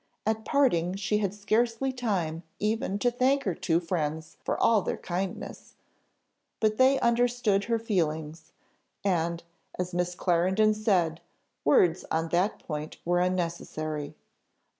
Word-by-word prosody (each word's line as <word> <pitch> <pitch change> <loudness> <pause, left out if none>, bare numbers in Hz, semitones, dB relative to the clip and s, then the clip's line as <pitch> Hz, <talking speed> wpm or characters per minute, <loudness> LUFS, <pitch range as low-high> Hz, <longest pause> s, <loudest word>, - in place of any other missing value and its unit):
At 220 +1 -1
parting 190 - +2
she 205 +2 0
had 200 -3 0
scarcely 230 +5 0
time 185 -10 -1 0.2
even 215 -1 -1
to 245 +4 +1
thank 265 +3 +2
her 190 - 0
two 165 0 +1
friends 160 -3 -3
for - - -1
all 225 -3 +4
their - - -2
kindness, 185 +1 -5 0.8
but 215 -1 +1
they 265 +1 +5
understood 235 -4 +2
her 230 -1 +1
feelings, 160 -7 -2 0.5
and, 170 -3 0 0.3
as 180 0 -3
Miss 180 0 -1
Clarendon 190 +5 +2
said, 185 -7 +1 0.4
words 165 +3 +4
on 160 +1 0
that 180 +5 +1
point 150 -1 -5
were 175 +1 +2
unnecessary. 165 -4 -2
185 Hz, 130 wpm, -28 LUFS, 165-220 Hz, 0.8 s, they